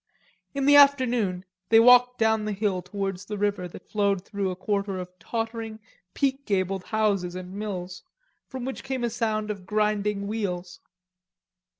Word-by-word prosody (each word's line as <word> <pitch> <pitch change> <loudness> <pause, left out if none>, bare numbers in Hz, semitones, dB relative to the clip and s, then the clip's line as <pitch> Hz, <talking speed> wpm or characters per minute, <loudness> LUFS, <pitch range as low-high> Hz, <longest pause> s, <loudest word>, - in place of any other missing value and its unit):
In 275 -1 0
the 290 +1 +7
afternoon 245 -10 +4 0.2
they 225 - +7
walked 250 +1 +6
down 220 -1 +2
the 215 - -2
hill 200 -2 -1
towards 195 -1 -4
the 210 +1 -5
river, 200 -3 -1
that 175 - -13
flowed 200 -3 0
through 200 -3 -2
a 185 - -3
quarter 200 0 -2
of 180 -1 -6
tottering, 225 +2 -4 0.4
peak 275 0 0
gabled 190 -1 0
houses 200 -5 0
and 185 0 -7
mills, 190 -3 -5 0.5
from 260 -2 -6
which 265 - -5
came 265 -2 -3
a 235 - 0
sound 215 -2 -1
of 195 -3 -8
grinding 210 -1 0
wheels. 185 -4 -4
210 Hz, 160 wpm, -26 LUFS, 190-230 Hz, 0.5 s, the